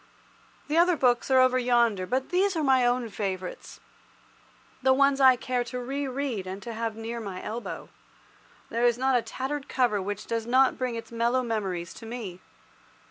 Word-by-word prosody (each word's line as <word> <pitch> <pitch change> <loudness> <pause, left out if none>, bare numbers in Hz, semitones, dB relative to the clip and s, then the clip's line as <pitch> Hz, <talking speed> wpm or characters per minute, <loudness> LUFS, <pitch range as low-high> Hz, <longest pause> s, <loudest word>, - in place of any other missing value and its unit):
The 310 +3 +2
other 355 0 +4
books 245 -2 +2
are 260 -1 +5
over 255 0 +4
yonder, 235 -6 +2
but 260 +4 -1
these 375 +1 +2
are 320 - 0
my 260 -3 +4
own 245 -1 0
favourites—the 190 -3 -5 1.2
ones 275 +1 +3
I 260 -1 +8
care 250 0 -2
to 250 +1 -5
re 275 +3 -3
read 255 -7 -3
and 190 +1 -5
to 235 - -6
have 225 -1 -3
near 225 +1 -5
my 195 -4 -6
elbow. 230 +3 -6 0.8
There 235 +1 -1
is 240 -1 +2
not 260 +1 +2
a 245 - +3
tattered 270 +4 -5
cover 240 -6 +1
which 205 +2 -4
does 230 -1 -3
not 260 +2 +4
bring 250 -2 -1
its 230 0 -7
mellow 235 +2 +1
memories 190 -7 -3
to 225 - -11
me. 220 -7 -6
240 Hz, 180 wpm, -27 LUFS, 225-260 Hz, 1.2 s, I